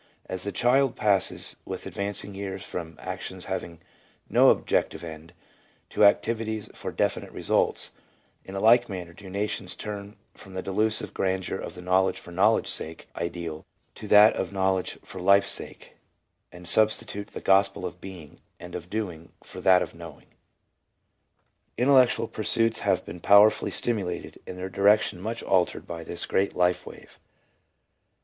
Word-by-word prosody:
As 95 Hz, -, -4 dB
the 100 Hz, -, -3 dB
child 130 Hz, +4 st, +2 dB
passes 100 Hz, -3 st, +1 dB
with -, -, -7 dB
advancing 100 Hz, 0 st, -3 dB
years 95 Hz, -1 st, -5 dB
from 80 Hz, -2 st, -7 dB
actions -, -, -6 dB
having 85 Hz, -1 st, -5 dB, 0.5 s
no -, -, +5 dB
objective -, -, 0 dB
end 80 Hz, 0 st, -9 dB, 0.6 s
to -, -, +2 dB
activities 110 Hz, +1 st, +1 dB
for -, -, -6 dB
definite -, -, -1 dB
results, -, -, +1 dB, 0.5 s
in 95 Hz, -, -9 dB
a -, -, -2 dB
like 120 Hz, +3 st, +5 dB
manner 90 Hz, -3 st, -6 dB
do 95 Hz, +1 st, -12 dB
nations 100 Hz, -1 st, -2 dB
turn 105 Hz, 0 st, -7 dB, 0.2 s
from 95 Hz, -1 st, -13 dB
the 95 Hz, -, -4 dB
delusive 110 Hz, +3 st, -1 dB
grandeur 95 Hz, 0 st, -2 dB
of 85 Hz, -, -7 dB
the 90 Hz, -, -10 dB
knowledge 95 Hz, +1 st, +2 dB
for 85 Hz, -, -11 dB
knowl 100 Hz, +6 st, +4 dB
edge's -, -, -1 dB
sake 80 Hz, +1 st, -6 dB
ideal 85 Hz, -2 st, -5 dB, 0.3 s
to 105 Hz, -, -9 dB
that 105 Hz, +1 st, +7 dB
of -, -, -3 dB
knowledge 95 Hz, -1 st, 0 dB
for 95 Hz, -, -8 dB
life's 100 Hz, +2 st, +4 dB
sake, -, -, -6 dB, 0.6 s
and 90 Hz, 0 st, -10 dB
substitute 105 Hz, -1 st, +3 dB
the -, -, -8 dB
Gospel 95 Hz, -1 st, +3 dB
of 90 Hz, -, -7 dB
Being 90 Hz, -6 st, -11 dB, 0.2 s
and 90 Hz, 0 st, -10 dB
of 90 Hz, 0 st, -7 dB
Doing 90 Hz, -7 st, -5 dB
for -, -, -9 dB
that 90 Hz, -1 st, +5 dB
of -, -, -8 dB
Knowing. 85 Hz, -3 st, -12 dB, 1.5 s
Intellectual 130 Hz, 0 st, +4 dB
pursuits 115 Hz, +1 st, 0 dB
have 95 Hz, -3 st, 0 dB
been 85 Hz, -, -8 dB
powerfully 100 Hz, +4 st, +5 dB
stimulated 100 Hz, -7 st, -3 dB
and 90 Hz, -, -7 dB
their 90 Hz, +1 st, -4 dB
direction 100 Hz, 0 st, +2 dB
much 115 Hz, +3 st, -4 dB
altered 90 Hz, -2 st, +1 dB
by 85 Hz, -1 st, -7 dB
this 85 Hz, -, -3 dB
great 100 Hz, +1 st, 0 dB
life 90 Hz, 0 st, +1 dB
wave. -, -, -13 dB
95 Hz, 155 wpm, -26 LUFS, 90-105 Hz, 1.5 s, that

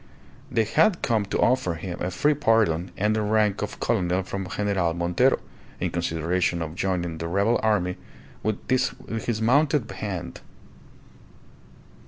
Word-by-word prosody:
They 115 Hz, -3 st, +2 dB
had 160 Hz, -, +2 dB
come 110 Hz, -4 st, +1 dB
to 100 Hz, -, -2 dB
offer 105 Hz, -9 st, +2 dB
him 85 Hz, +1 st, -6 dB
a 90 Hz, -, 0 dB
free 145 Hz, +12 st, +2 dB
pardon 110 Hz, -, +2 dB
and 105 Hz, +2 st, +1 dB
the 110 Hz, -, +1 dB
rank 105 Hz, -1 st, +1 dB
of 105 Hz, -, -5 dB
colonel 95 Hz, -4 st, +1 dB
from 95 Hz, 0 st, -5 dB
General 95 Hz, -5 st, 0 dB
Montero 85 Hz, 0 st, +2 dB, 0.4 s
in -, -, -1 dB
consideration 85 Hz, +1 st, 0 dB
of 80 Hz, -1 st, -6 dB
joining 90 Hz, -3 st, -2 dB
the 85 Hz, -, -3 dB
rebel 100 Hz, +7 st, +2 dB
army 95 Hz, -5 st, +1 dB, 0.4 s
with 110 Hz, -2 st, -3 dB
his 120 Hz, -3 st, -1 dB
mounted 140 Hz, +2 st, +3 dB
band. 90 Hz, -, -6 dB
100 Hz, 140 wpm, -25 LUFS, 90-110 Hz, 0.4 s, mounted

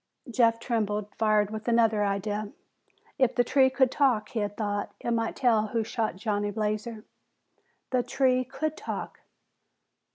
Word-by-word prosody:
Jeff 230 Hz, -1 st, +3 dB
trembled, 210 Hz, -3 st, -2 dB
fired 215 Hz, -2 st, +3 dB
with 220 Hz, +1 st, -6 dB
another 225 Hz, -3 st, +3 dB
idea. 205 Hz, +1 st, -2 dB, 0.7 s
If 260 Hz, -3 st, +3 dB
the 245 Hz, -, +4 dB
tree 260 Hz, +2 st, +4 dB
could 260 Hz, -1 st, +2 dB
talk, 250 Hz, -7 st, +2 dB
he 235 Hz, -, -3 dB
had 205 Hz, -1 st, -3 dB
thought, 205 Hz, -2 st, -2 dB
it 235 Hz, -, -3 dB
might 230 Hz, -1 st, -1 dB
tell 225 Hz, -4 st, +2 dB
who 225 Hz, +1 st, -1 dB
shot 220 Hz, -3 st, -2 dB
Johnny 205 Hz, 0 st, -1 dB
Blazer. 215 Hz, +1 st, -3 dB, 0.9 s
_The 250 Hz, -2 st, +1 dB
tree 255 Hz, 0 st, +2 dB
could 310 Hz, +4 st, -3 dB
talk! -, -, -6 dB
225 Hz, 150 wpm, -27 LUFS, 210-245 Hz, 0.9 s, the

